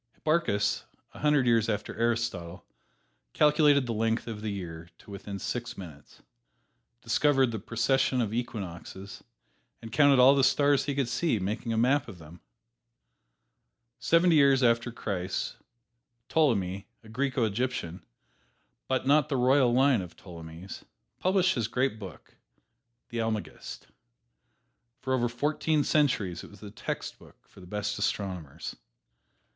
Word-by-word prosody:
Hipparchus, 155 -11 0 0.3
a - - -12
hundred 150 -3 +3
years 115 -2 +3
after 105 -1 -3
Aristotle, 115 -7 -2 0.7
calculated 150 -2 +4
the 120 - -2
length 115 +1 0
of 110 -3 -6
the 110 - -3
year 85 -4 -6
to - - -15
within 100 0 -7
six 120 +4 -4
minutes, 80 -7 -12 0.8
discovered 135 +2 +2
the 110 - -4
precession 125 +5 +1
of 110 -3 -1
equinoxes 100 -4 -6 0.6
and 115 - -10
counted 140 +1 +5
all 130 +2 +7
the 140 -1 +2
stars 140 +1 +3
he 140 - -2
could 140 -3 0
see, 135 +1 0
making 105 +5 -3
a 115 - -1
map 130 +4 +2
of 100 -6 -10
them. 80 +2 -14 1.6
Seventy 170 0 +4
years 140 -2 +5
after 115 0 +2
Christ, 95 -5 -4 0.7
Ptolemy, 100 - +1 0.2
a - - -15
Greco 130 +2 -1
Egyptian, 110 -5 -2 0.8
but 130 0 0
not 145 +2 +4
of - - -23
the 135 - 0
royal 130 0 +4
line 130 -2 +4
of 90 -2 -9
Ptolemies, 85 0 -10 0.4
published 185 0 +2
his 115 -4 -1
great 125 -1 -1
book, 95 -9 -11 0.7
"The 120 -2 -4
Almagest." 110 -2 -5 1.1
For 130 - -2
over 120 -2 +1
fourteen 150 +4 0
centuries 110 - +1
it - - -11
was 100 - -15
the 105 -1 -10
textbook - - -7
for - - -18
the 90 - -13
best 105 +1 -3
astronomers. 90 -7 -3
115 Hz, 140 wpm, -28 LUFS, 100-135 Hz, 1.6 s, all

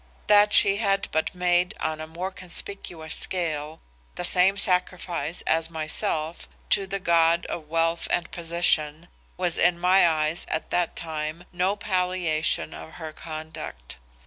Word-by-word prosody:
That 210 0 +5
she 200 -1 +6
had 195 -2 +1
but 160 +3 -1
made 180 +2 +1
on 155 0 -2
a 155 - -6
more 175 +4 -5
conspicuous 175 -3 -2
scale, 160 -3 -2 0.4
the 180 - -3
same 185 +2 +4
sacrifice 180 -4 0
as 165 0 +2
myself 160 0 -3 0.2
to 195 - +2
the 195 +1 -3
god 170 -1 +3
of 155 -3 -6
Wealth 165 +1 0
and 175 -1 -1
Position, 165 -1 +1 0.3
was 180 -2 0
in 175 0 +3
my 180 0 +5
eyes 155 +1 -1
at 155 - -3
that 175 -2 0
time, 155 +1 -4
no 185 +3 +1
palliation 180 -6 0
of 160 - -10
her 160 -2 -8
conduct. 155 - -8
170 Hz, 145 wpm, -25 LUFS, 160-180 Hz, 0.4 s, she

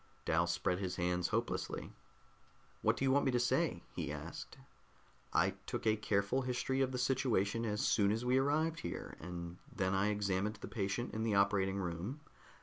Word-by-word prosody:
Dal 85 +2 +3
spread 90 +1 0
his 95 -2 -2
hands 90 0 +1
hopelessly. - - -2 0.9
"What - - +3
do 135 - +1
you 135 - +4
want 140 +1 +4
me 135 - +3
to 120 - +3
say?" 120 - +1
he - - -2
asked. - - -7 0.7
"I - - +3 0.2
took - - -3
a 110 -1 +4
careful 105 +3 +1
history 130 +1 0
of 130 -1 +2
the 130 - -2
situation 115 -4 +1
as 105 -1 -1
soon 100 -1 +4
as 115 +3 -1
we 125 +1 +4
arrived 155 +4 +1
here, - - -5
and 85 0 -6
then 95 0 0
I 95 +2 +3
examined 100 0 0
the - - -6
patient 105 +3 -2
in 110 - -2
the 110 -2 +1
operating 100 -1 +3
room. 95 - -3
105 Hz, 180 wpm, -35 LUFS, 95-125 Hz, 0.9 s, you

